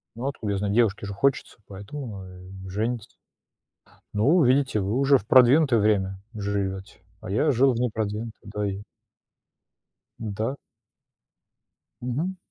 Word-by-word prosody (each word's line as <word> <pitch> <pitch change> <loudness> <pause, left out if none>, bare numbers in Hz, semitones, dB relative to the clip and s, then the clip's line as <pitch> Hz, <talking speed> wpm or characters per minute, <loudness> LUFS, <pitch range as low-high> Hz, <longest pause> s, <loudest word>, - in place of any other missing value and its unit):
Ну 120 +4 -4
откуда 110 -7 -3
я 100 - -1
знаю, 100 0 -1
девушке 105 -3 +2
же 100 - -5
хочется, 135 +7 0
поэтому 100 +9 -7
ну, 100 -5 -7
э, 95 +1 -11
женится. 110 +3 -3 1.0
Ну, 145 - +4
видите, 130 -2 +3
вы 100 +1 -1
уже 140 +1 +5
в - - -10
продвинутое 130 +1 +6
время 95 -2 +1 0.2
живёте, 100 -1 -3 0.2
а - - -7
я 135 +9 +2
жил 130 +1 +4
в 115 - -3
непродвинутое, 110 -1 -2
да 105 -1 -1
и 100 +1 -6 1.4
Да. 110 +4 -3 1.5
Мгм. 150 +10 -2
110 Hz, 135 wpm, -25 LUFS, 100-130 Hz, 1.5 s, продвинутое